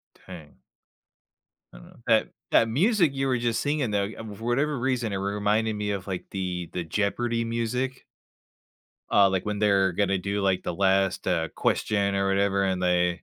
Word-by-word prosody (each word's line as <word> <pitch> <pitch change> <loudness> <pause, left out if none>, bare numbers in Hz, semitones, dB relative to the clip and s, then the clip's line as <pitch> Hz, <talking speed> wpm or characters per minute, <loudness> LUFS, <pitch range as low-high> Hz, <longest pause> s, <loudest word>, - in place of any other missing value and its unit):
Dang. 85 -5 -13 1.1
I - - -12
know. - - -16
That 110 -2 +3 0.2
that 115 - +4
music 170 - +2
you 135 0 -1
were 125 -2 +1
just 120 -1 0
singing, 145 -5 0
though, 100 -1 +1
you 100 - -7
um, 110 -2 -7
for 110 - -10
whatever 140 +4 0
reason, 120 -4 -1
it - - -1
re 100 +1 -2
reminded 105 +2 +1
me 105 0 -3
of, 100 -2 -4
like, 95 -2 -4
the 90 -3 -4
the 90 - -3
Jeopardy 115 +7 -1
music. 115 +3 -2 1.1
Uh, 100 -1 +5
like, 95 0 -2
when 105 -1 -2
they're 100 -2 +3
gonna 100 +1 +1
do, 100 +3 -2
like, 95 -2 +1
the 90 - -3
last, 95 0 +1
uh, 85 -3 0
question 100 -2 0
or 100 0 +1
whatever, 100 0 +1
and 95 -1 -1
they, 90 -1 +1
100 Hz, 185 wpm, -26 LUFS, 95-115 Hz, 1.1 s, Uh